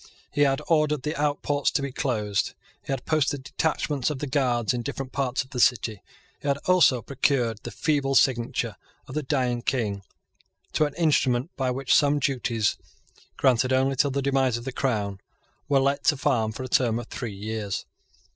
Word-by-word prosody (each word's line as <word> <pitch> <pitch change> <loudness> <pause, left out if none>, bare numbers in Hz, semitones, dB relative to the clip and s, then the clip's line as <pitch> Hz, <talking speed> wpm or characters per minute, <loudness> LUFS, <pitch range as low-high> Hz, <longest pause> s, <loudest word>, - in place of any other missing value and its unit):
He 145 - -1
had 140 +1 +3
ordered 150 -3 +2
the 150 +2 -2
outports 145 -1 0
to - - +1
be 140 - -3
closed. 105 -7 -1 0.3
He - - -7
had 135 -2 -3
posted 145 -3 0
detachments 150 -2 -1
of 150 - -3
the 145 - -3
Guards 125 -5 +1
in 120 - -2
different 135 +1 -5
parts 135 -2 -1
of 130 - -21
the 125 - -4
city. 110 -4 +2 0.4
He - - -5
had 140 0 +2
also 170 -10 +4
procured 125 -5 0
the - - -6
feeble 135 +4 0
signature 120 -3 +2 0.3
of - - -9
the 155 - -1
dying 130 -4 0
King 110 -6 -1 0.7
to 155 - +3
an 145 -1 -5
instrument 145 -3 +2
by 130 -2 -1
which 130 +1 0
some 145 0 +4
duties, 120 -5 0 0.6
granted 130 -1 +3
only 135 +1 +2
till 140 +2 +2
the 140 0 -2
demise 135 -3 +2
of 120 - -8
the 135 - -3
Crown, 105 -7 -1 0.5
were 140 -1 +4
let 140 +1 +1
to 145 -1 +4
farm 120 -6 +1
for 130 - -6
a - - -4
term 120 -3 +2
of 120 - -5
three 115 -6 -5
years. 105 -1 -4
130 Hz, 185 wpm, -26 LUFS, 120-145 Hz, 0.7 s, also